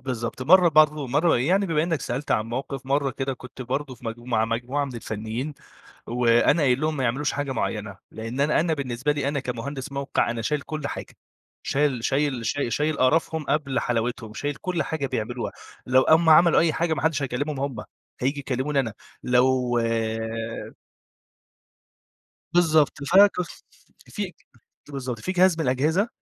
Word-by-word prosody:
بالضبط. 125 -1 -4
مرّة 180 +5 +6
برضه 150 -2 +4
مرّة 150 +7 +3
يعني 185 +10 +2
بما 160 -3 +1
إنّك 165 -2 -1
سألت 130 +5 -4
عن 110 - +2
موقف، 130 +2 -5
مرّة 140 0 +1
كده 135 0 -3
كنت 130 +1 -10
برضه 135 +2 -3
في 120 - -19
مج 115 +1 -4
ومع 120 -2 0
مجموعة 120 +5 -1
من 135 -3 -7
الفنّيين، 115 +5 -4 0.5
وأنا 120 +6 +3
قايل 130 -2 +3
لهم 155 0 0
ما 135 - -1
يعملوش 135 +4 0
حاجة 145 -2 -2
معيّنة، - - -3
لإن 115 +4 -5
أنا 150 +2 +3
أنا 160 0 +1
بالنسبة 130 0 -1
لي 145 -2 -1
أنا 140 0 -1
كمهندس 130 +2 -5
موقع، 140 -3 0
أنا 115 -1 -3
شايل 150 +6 0
كل 155 -1 -5
حاجة. - - -7 0.5
شايل 135 -4 0
شايل 135 -4 0
ش 135 +6 -1
شايل 150 +5 0
قرفهم 160 +4 +2
قبل 140 -3 0
حلاوتهم، 115 -2 -2
شايل 145 +3 -3
كل 175 +2 -2
حاجة 145 -1 -3
بيعملوها. 120 0 -3 0.3
لو 130 +1 +5
أمّا 160 +3 +5
عملوا 170 +2 +6
أي 165 -1 +3
حاجة 165 0 0
ما 145 - -4
حدّش 155 -2 +1
هيكلّمهم 140 +2 -2
هم، 140 -3 -3 0.4
هييجي 140 +3 0
يكلّموني 135 +1 0
أنا. 115 -5 -4 0.3
لو 125 0 +2 2.8
بالضبط. 160 -4 +3
فكف 190 -2 +4 0.4
في - - -4 0.6
ت - - -14
بالضبط. 130 -4 -4
في 185 - -3
جهاز 185 -2 +4
من 160 - 0
الأجهزة 155 - +1
140 Hz, 165 wpm, -24 LUFS, 125-155 Hz, 2.8 s, مرّة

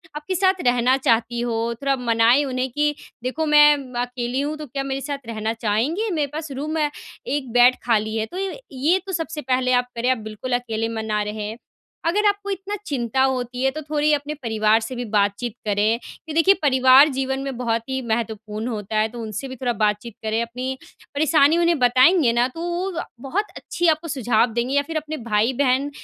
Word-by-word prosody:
आपके 300 +5 -4
साथ 375 0 +2
रहना 245 +1 +3
चाहती 235 -2 +1
हो। 235 -1 -1
थोड़ा 275 -1 +1
मनाएँ 235 +2 +3
उन्हें 255 -1 -2
कि, 295 +3 0 0.3
"देखो 290 +5 -2
मैं 295 -1 +7 0.3
अकेली 245 +1 -2
हूँ, 295 +2 -2
तो 305 - -7
क्या 275 +2 -4
मेरे 270 0 -3
साथ 280 -3 -6
रहना 220 -1 -2
चाहेंगे? 285 - 0
मेरे 300 -4 0
पास 310 -1 -5
रूम 300 +4 -3
है, 300 -2 +1 0.4
एक 275 -4 -2
बेड 245 +1 +6
खाली 220 -2 +1
है।" 220 - 0
तो 350 +11 -9
ये 390 0 -2
ये, - - -11 0.3
ये 375 - +4
तो 385 - -5
सबसे 320 -2 -3
पहले 255 -1 0
आप 245 - -17
करें, 235 +2 0
आप 255 - +1
बिल्कुल 230 +4 -5
अकेले 225 -2 -3
में 225 -1 -4
ना 210 -1 -1
रहें। 210 +1 -5 0.5
अगर 415 +5 +2
आपको 405 0 -1
इतना 395 +1 -3
चिंता 260 - -1
होती 250 -1 -1
है, 270 - +4
तो 310 +3 -6
थोड़ी 300 0 0
अपने 295 +1 -1
परिवार 220 -5 +1
से 225 +3 -5
भी 245 - -3
बातचीत 205 +3 +1
करें 210 +3 +1 0.3
कि 315 - -5
देखिए, 330 +5 +5
परिवार 260 +1 +6
जीवन 265 -1 -2
में 270 -2 -5
बहुत 230 -2 0
ही 265 0 -2
महत्वपूर्ण 220 -1 -3
होता 215 -2 -3
है, 215 - +2
तो 240 +1 -9
उनसे 220 +4 -5
भी 260 - -7
थोड़ा 245 -1 -1
बातचीत 210 +2 -1
करें। 220 +1 0
अपनी 250 +3 -4 0.4
परेशानी 305 +1 +4
उन्हें 340 -1 +3
बताएँगे 255 +4 +5
ना, 240 +1 +2
तो 330 +6 -9
वो 350 0 -2 0.3
बहुत 400 +10 0
अच्छी 345 0 -2
आपको 325 +2 -10
सुझाव 245 -5 +1
देंगे, 240 +4 -1
या 285 - +4
फिर 325 - -2
अपने 310 0 -4
भाई-बहन, 255 +6 +2
255 Hz, 205 wpm, -22 LUFS, 230-300 Hz, 0.5 s, मैं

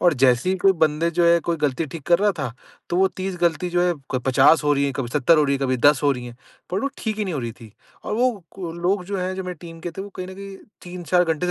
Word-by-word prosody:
और 175 -3 +4
जैसे 125 +6 +4
ही 190 - +1
कोई 195 +1 +4
बंदे 160 +2 +2
जो 170 +1 +1
है 170 0 +5
कोई 170 -1 +1
गलती 150 +3 0
ठीक 155 +2 -8
कर 170 0 +4
रहा 205 0 +3
था 125 -5 -3 0.4
तो 175 - 0
वो 190 +1 +4
30 190 -1 -3
गलती 170 0 +1
जो 175 0 +2
है 175 - +1 0.2
क 130 - +2
50 135 +5 +5
हो 145 - +3
रही 140 0 +1
है, 140 - -1
कभी 130 -3 -3
70 150 +5 +3
हो 150 - +4
रही 140 -1 +1
है, - - -2
कभी 130 -1 +1
10 145 +3 +4
हो 145 -1 +4
रही 125 -1 -6
है, 120 0 -10 0.3
पर 185 +2 -1
वो 275 - 0
ठीक 215 -1 -3
ही 210 - 0
नहीं 185 - -3
हो 140 - -2
रही 120 -1 -4
थीं। 110 - -12 0.3
और - - -2
वो 250 +3 +2 0.2
को 175 -4 -6
लोग 180 +2 -1
जो 200 +1 -4
हैं 185 +1 -2
जो 190 - -4
मेरी 180 0 -5
टीम 165 -1 -10
के 175 - -5
थे 190 +4 -7
वो 200 - -8
कहीं 185 - -5
न 190 - -8
कहीं 195 0 -9 0.3
3-4 180 0 0
घंटे 165 +1 -1
170 Hz, 310 wpm, -22 LUFS, 145-185 Hz, 0.4 s, है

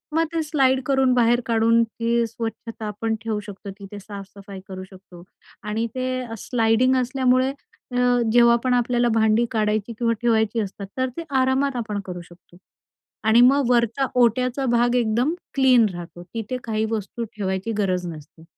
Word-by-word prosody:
मग 330 0 +3
ते 330 - 0
स्लाईड 265 -4 +2
करून 265 -2 +3
बाहेर 240 0 +3
काढून 230 0 +3
ती 230 +1 -1
स्वच्छता 225 0 -6
आपण 220 +2 -2
ठेवू 220 -2 -2
शकतो, 205 -1 -9
तिथे 200 +1 -9
साफसफाई 200 -1 -10
करू 185 -1 -7
शकतो 185 -2 -14 0.4
आणि 215 +2 -2
ते 255 0 -2
अ, 240 -3 -7
स्लाईडिंग 235 +3 +2
असल्यामुळे 255 0 +2 0.4
अ, 245 - -1 0.3
जेव्हा 235 0 +6
पण 255 -1 +1
आपल्याला 245 0 +2
भांडी 220 +1 +3
काढायची 215 0 0
किंवा 230 -1 +2
ठेवायची 225 -1 +1
असतात 200 0 -6
तर 260 0 0
ते 335 - -3 0.2
आरामात 265 +1 +1
आपण 215 -4 -3
करू 180 -1 -6
शकतो 175 0 -19 0.7
आणि 220 +2 +6
मग 275 +2 +5
वरचा 240 +2 +2 0.2
ओट्याचा 250 +3 +1
भाग 240 0 +2
एकदम 240 +5 +1 0.2
क्लीन 255 -4 +5
राहतो, 175 0 -9
तिथे 225 +7 -5
काही 220 -1 -1
वस्तू 225 +2 -3
ठेवायची 190 +1 -2
गरज 185 -3 0
नसते. 160 0 -11
230 Hz, 160 wpm, -23 LUFS, 210-250 Hz, 0.7 s, जेव्हा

